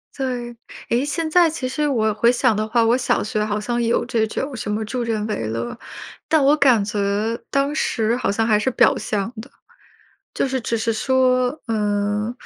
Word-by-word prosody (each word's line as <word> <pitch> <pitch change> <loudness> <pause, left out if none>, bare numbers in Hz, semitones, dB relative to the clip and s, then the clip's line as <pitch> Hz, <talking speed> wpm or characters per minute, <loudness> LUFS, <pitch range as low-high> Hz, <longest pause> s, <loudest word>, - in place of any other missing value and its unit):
对， 245 -3 -4 0.3
诶， 240 +3 +1
现 320 +3 -2
在 340 0 +5
其 295 -5 -4
实 295 +3 -1
我 220 -6 +1
回 235 +3 +3
想 245 -2 +2
的 215 +1 -1
话， 230 +1 +2
我 235 +2 +4
小 260 - 0
学 215 0 -1
好 210 0 -2
像 240 +2 -2
有 230 0 +1
这 220 -2 0
种 265 +5 -4
什 210 -2 -4
么 215 +1 -2
助 250 +3 -3
人 225 -3 -2
为 210 - -3
乐， 115 +2 -4 0.5
但 315 -3 +3
我 290 - +5
感 250 -9 +4
觉 210 0 -3 0.5
当 275 +1 0
时 230 -6 0
好 245 -5 -1
像 225 +2 0
还 215 -2 +3
是 235 - 0
表 - - +4
象 210 +3 -3
的， 260 - -13 0.8
就 - - 0
是 260 -1 -2
只 230 0 -2
是 225 +1 0
说， 255 +3 +1
嗯， 210 0 -1
235 Hz, 210 characters per minute, -21 LUFS, 215-260 Hz, 0.8 s, 在